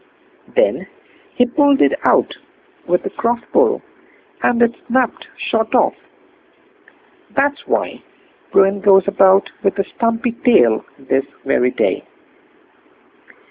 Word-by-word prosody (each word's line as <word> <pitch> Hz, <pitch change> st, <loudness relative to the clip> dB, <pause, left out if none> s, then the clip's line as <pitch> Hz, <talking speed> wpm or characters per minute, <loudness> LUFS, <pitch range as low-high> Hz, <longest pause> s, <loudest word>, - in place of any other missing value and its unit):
Then -, -, +1 dB, 0.5 s
he 245 Hz, -, +3 dB
pulled 280 Hz, +2 st, +2 dB
it 140 Hz, -, +3 dB
out -, -, +2 dB, 0.5 s
with 180 Hz, +1 st, 0 dB
a -, -, -4 dB
cross 235 Hz, +1 st, -1 dB
pull, 460 Hz, -1 st, +2 dB, 0.6 s
and 240 Hz, -, +1 dB
it 235 Hz, 0 st, +2 dB
snapped 255 Hz, 0 st, -1 dB
short 225 Hz, -1 st, -1 dB
off. -, -, +3 dB, 1.4 s
That's 285 Hz, +1 st, -1 dB
why -, -, -2 dB, 0.5 s
Bruin 195 Hz, +1 st, +3 dB
goes 195 Hz, -2 st, +4 dB
about 195 Hz, 0 st, +3 dB
with 195 Hz, -, 0 dB
a 195 Hz, -, +1 dB
stumpy 230 Hz, +1 st, -1 dB
tail 120 Hz, -, +4 dB
this 135 Hz, 0 st, -1 dB, 0.2 s
very 125 Hz, -2 st, +2 dB
day. -, -, -1 dB
225 Hz, 115 wpm, -17 LUFS, 190-245 Hz, 1.4 s, goes